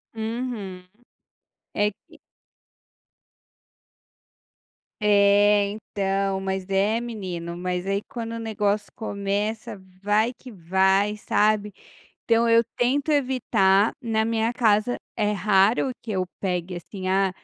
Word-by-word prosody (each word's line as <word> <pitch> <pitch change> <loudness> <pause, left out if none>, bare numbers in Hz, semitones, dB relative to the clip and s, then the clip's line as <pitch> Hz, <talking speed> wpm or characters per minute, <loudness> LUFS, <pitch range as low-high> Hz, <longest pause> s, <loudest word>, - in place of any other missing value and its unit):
Uhum, 220 -5 -4 0.9
é 205 0 +2
que - - -22 2.8
É, 205 0 +5
então, 195 -2 -2
mas, 190 -1 -3
é, 200 +4 +2
menino, 185 -8 -5
mas 180 +1 -3
aí 195 +1 0
quando 230 -1 -5
o 230 - -4
negócio 210 -2 -1
começa, 205 0 -3 0.2
vai 215 +4 +2
que 255 - -12
vai, 190 +2 +2
sabe. 210 0 +1 0.5
Então 230 0 +3
eu 230 0 +5
tento 270 +5 +1
evitar, 230 -8 +3
na 225 -3 0
minha 225 0 0
casa 220 0 +2 0.2
é 210 -2 0
raro 205 +5 +3
que 225 - -5
eu 185 -2 0 0.2
pegue, 180 -1 -2
assim, 185 +2 -6
ah, 195 0 +2
205 Hz, 110 wpm, -24 LUFS, 195-225 Hz, 2.8 s, É